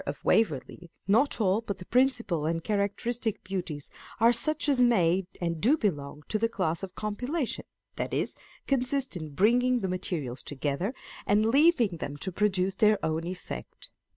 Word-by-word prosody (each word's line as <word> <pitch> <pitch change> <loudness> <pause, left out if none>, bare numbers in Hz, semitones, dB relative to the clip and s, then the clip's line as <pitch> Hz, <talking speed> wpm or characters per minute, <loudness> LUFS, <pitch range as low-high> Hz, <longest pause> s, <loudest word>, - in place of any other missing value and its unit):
of - - -5
Waverley, 175 - +1 0.2
not 235 +9 +3
all, 205 0 +2
but 200 -4 -4
the 180 - -10
principal 235 - +1
and 165 0 -1
charac 200 -2 0
teristic 230 -3 -2
beauties 175 -6 -5 0.3
are 230 +2 +6
such 305 +7 +1
as 275 -3 +3
may 190 -6 +3
and 170 -2 -2
do 275 +8 +4
belong 150 - -2
to 215 - -1
the 230 +1 +1
class 170 -7 -1
of 190 -1 -7
compilation, 250 +7 -2 0.3
that - - -2
is, - - -1 0.3
consist 265 -2 0
in 155 -3 -5
bringing 245 - +3
the 190 - -1
materials 165 -8 -3
together 145 - -2 0.3
and 210 +2 +4
leaving 250 - +4
them 145 -2 -5
to 190 - -4
produce 190 -1 +1
their 215 +1 +4
own 160 +1 -1
effect. 180 0 -8
200 Hz, 165 wpm, -28 LUFS, 170-240 Hz, 0.3 s, are